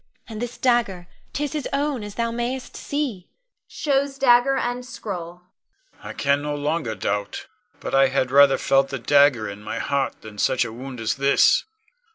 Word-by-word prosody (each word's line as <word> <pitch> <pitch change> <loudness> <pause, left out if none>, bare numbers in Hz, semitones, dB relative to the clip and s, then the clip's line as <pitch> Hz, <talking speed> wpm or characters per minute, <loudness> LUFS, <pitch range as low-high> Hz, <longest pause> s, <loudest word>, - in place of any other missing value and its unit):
And 220 -2 -7
this 245 0 -5
dagger, 235 -8 +1 0.3
'tis 295 +1 -3
his 300 -2 -3
own, 280 -4 -1
as 205 0 -8
thou 230 0 -1
mayst 240 +2 -4
see 270 -11 -4 0.4
[shows 280 -1 -1
dagger 265 0 +4
and 245 0 -2
scroll]. 180 -8 -7 0.6
Con. - - -9
I - - -6
can 140 0 +1
no 150 0 -3
longer 145 -5 -2
doubt; 100 -1 -3 0.3
but - - -6
I 135 0 +5
had 130 -1 0
rather 140 0 +6
have - - -6
felt 135 0 +3
the 135 - -3
dagger 135 -3 +3
in 100 +1 -8
my - - -5
heart 140 -1 -2
than 105 -1 -10
such 130 -2 +2
a 110 - -7
wound 130 +1 -8
as 115 +2 -1
this. 140 - +4
170 Hz, 185 wpm, -23 LUFS, -, 0.6 s, rather